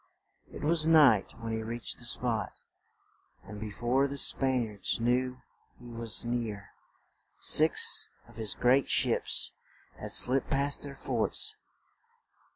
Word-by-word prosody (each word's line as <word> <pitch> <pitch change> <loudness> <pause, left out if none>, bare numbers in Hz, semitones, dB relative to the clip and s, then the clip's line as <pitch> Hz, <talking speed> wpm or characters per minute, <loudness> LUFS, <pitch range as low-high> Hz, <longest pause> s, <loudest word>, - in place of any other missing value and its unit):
It - - -10
was 160 +1 0
night 145 -11 +4
when 115 0 -6
he 110 - -3
reached 115 +1 -4
the 120 - -9
spot, 120 -2 -1 0.9
and 105 -1 -11
be 110 0 -7
fore 120 +7 -1
the 140 +1 -7
Span 130 -3 0
iards 105 -1 -4
knew 125 +2 -2 0.4
he 120 - -16
was 115 -1 -7
near, 115 -4 -5 0.7
six - - +6 0.2
of 120 -1 -18
his 110 -3 -2
great 130 +2 +1
ships - - +2 0.5
had - - -6
slipped 130 +2 +2
past 140 +1 0
their 140 -1 -6
forts. 120 -4 -2
120 Hz, 135 wpm, -28 LUFS, 110-135 Hz, 0.9 s, six